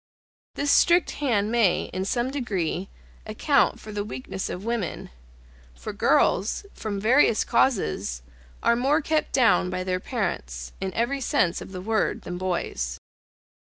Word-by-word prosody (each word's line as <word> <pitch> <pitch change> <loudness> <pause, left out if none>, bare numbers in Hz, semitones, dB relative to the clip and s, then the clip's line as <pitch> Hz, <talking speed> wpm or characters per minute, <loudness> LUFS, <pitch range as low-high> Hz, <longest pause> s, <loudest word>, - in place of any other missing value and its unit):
This 285 0 +1
strict 345 +1 +4
hand 220 -6 +1
may, 230 -6 +2
in 185 +1 -2
some 240 +5 -1
degree, 195 - -2 0.4
account 275 +7 +2
for 215 - -9
the 205 -1 -2
weakness 190 +1 -5
of 185 +4 -6
women; 230 - -3 0.6
for - - -7
girls, 205 - +2
from 205 -2 -4
various 230 +1 +4
causes, 75 - 0 0.4
are 235 - +4
more 275 +6 +2
kept 310 +1 0
down 190 -8 +3
by 185 0 -3
their 185 0 -1
parents, 65 - -4
in 190 -1 -2
every 260 +4 0
sense 180 -8 +1
of - - -9
the 185 -1 -6
word, 220 +2 0
than 175 0 -5
boys. 170 - -2
205 Hz, 145 wpm, -25 LUFS, 180-245 Hz, 0.6 s, strict